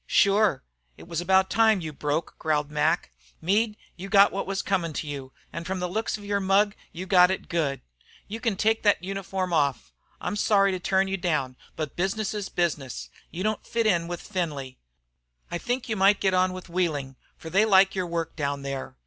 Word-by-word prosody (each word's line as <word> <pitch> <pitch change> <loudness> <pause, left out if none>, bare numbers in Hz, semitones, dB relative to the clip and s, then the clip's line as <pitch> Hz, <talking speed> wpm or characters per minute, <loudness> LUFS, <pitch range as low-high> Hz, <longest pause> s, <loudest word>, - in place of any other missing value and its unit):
"Shure, 200 -7 +3 0.3
it - - -13
was 170 -1 -2
about 190 +1 +3
time 220 -3 +4
you 160 -3 -6
broke 150 +3 -2
out," - - -43
growled 150 -2 0
Mac. 150 - +1 0.3
"Meade, 210 +5 +1 0.2
you 190 +2 -8
got 200 0 +6
what 195 - -3
was 195 0 -2
comin' 175 -5 -1
to 155 - -3
you, 140 -3 -6 0.2
an' 170 - -4
from 190 +1 -3
the 180 - -1
looks 215 +6 -2
of 205 - -12
your 200 0 0
mug 200 +1 +3 0.2
you 180 +2 -6
got 180 -2 +6
it 190 - -3
good. 155 -5 -1 0.5
You 225 +3 -6
can 230 -4 0
take 220 +3 +1
thet 205 -4 +3
uniform 190 -1 -3
off. 140 - 0 0.3
I'm 210 - -3
sorry 200 -2 +3
to 185 - -2
turn 190 +2 +1
you 195 0 -1
down, 150 -8 -1 0.2
but 155 -3 -4
business 195 +4 -1
is 205 -2 -4
business. 150 -7 -2 0.2
You 180 +2 -5
don't 215 0 -1
fit 230 -1 -1
in 170 -5 +2
with 175 0 -5
Findlay. 150 -9 -4 0.7
I 175 - -2
think 245 +4 -2
you 220 - -1
might 195 +1 +4
get 190 -1 +1
on 185 0 +3
with 185 0 -8
Wheeling, 155 -7 -1 0.2
for 160 - -9
they 195 +5 +4
like 195 -3 +5
your 185 -2 -2
work 165 -1 -3
down 140 -2 -2
there. 135 -1 -5
185 Hz, 210 wpm, -26 LUFS, 160-200 Hz, 0.7 s, got